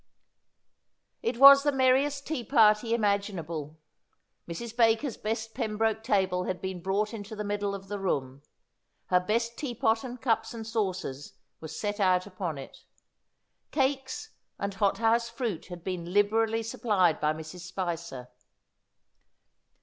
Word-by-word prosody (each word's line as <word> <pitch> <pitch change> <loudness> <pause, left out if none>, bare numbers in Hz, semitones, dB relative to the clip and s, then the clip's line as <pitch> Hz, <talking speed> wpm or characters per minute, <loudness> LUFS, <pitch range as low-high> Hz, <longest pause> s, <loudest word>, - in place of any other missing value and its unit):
It 235 - -1
was 275 +1 +10
the 290 +1 +2
merriest 270 +2 +2
tea 300 -6 -3
party 225 -1 +4
imaginable. 180 -8 -2 0.7
Mrs. 225 +7 -6
Baker's 230 +3 +3
best 225 +1 -4
Pembroke 220 -2 -1
table 190 -5 +1
had 185 - -3
been 190 -2 -5
brought 200 +4 -1
into 215 0 -7
the 210 - -4
middle 205 -1 -2
of 195 0 -9
the 205 +1 -4
room; 135 -8 -2 0.7
her 180 - +6
best 230 +5 -1
tea 260 -5 -4
pot 225 0 +1
and 250 -1 -7
cups 235 -1 0
and 225 -1 -6
saucers 185 - -3 0.3
were 160 - -7
set 205 +6 -4
out 185 -2 +3
upon 185 -6 -4
it. 135 - -10 0.9
Cakes 270 -1 -1 0.3
and 200 0 -3
hot 195 0 +1
house 230 +1 +2
fruit 230 -7 -4
had 175 -2 -9
been 175 -2 -4
liberally 220 +3 +2
supplied 205 -7 +1
by 150 0 +2
Mrs. 155 +3 -7
Spicer. 170 -8 -5
210 Hz, 140 wpm, -28 LUFS, 180-230 Hz, 0.9 s, was